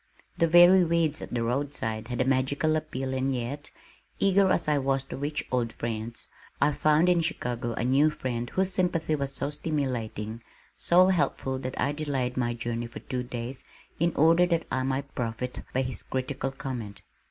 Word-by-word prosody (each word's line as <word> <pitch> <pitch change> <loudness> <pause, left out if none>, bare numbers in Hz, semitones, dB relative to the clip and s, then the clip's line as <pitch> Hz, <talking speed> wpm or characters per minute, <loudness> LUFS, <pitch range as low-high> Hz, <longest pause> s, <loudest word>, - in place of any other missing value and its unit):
The 165 - +2
very 175 +3 +7
weeds 165 -2 +1
at - - -7
the 120 -1 -1
roadside 115 -3 -1
had 125 -1 -4
a - - +2
magical 135 +4 +1
appeal 135 -4 -3
and 130 +1 0
yet, 130 +3 -3 0.5
eager 195 0 +4
as 175 - +2
I 150 -1 +3
was 135 0 0
to - - -8
reach 145 +2 -2
old 120 -3 0
friends, 115 0 -5 0.3
I 145 - +4
found 155 +4 +3
in 175 -1 +4
Chicago 125 -8 -2
a - - -2
new 135 +5 +4
friend 120 -5 -4
whose 190 0 0
sympathy 170 -4 0
was 140 -2 -1
so 140 +2 -3
stimulating, 120 -8 -3 0.3
so 180 +2 +4
helpful 135 -7 0
that 130 0 -5
I 140 - +2
delayed 140 -4 -2
my 120 -2 0
journey 120 0 -3
for 115 - -10
two 125 -1 -3
days 125 +1 -5 0.4
in 170 +2 +2
order 165 +3 +5
that 170 -2 0
I 130 - 0
might 135 +1 -2
profit 125 +1 -3
by 130 - +1
his 130 -1 -1
critical 130 +1 -3
comment. 120 -7 -6
135 Hz, 180 wpm, -27 LUFS, 125-155 Hz, 0.5 s, very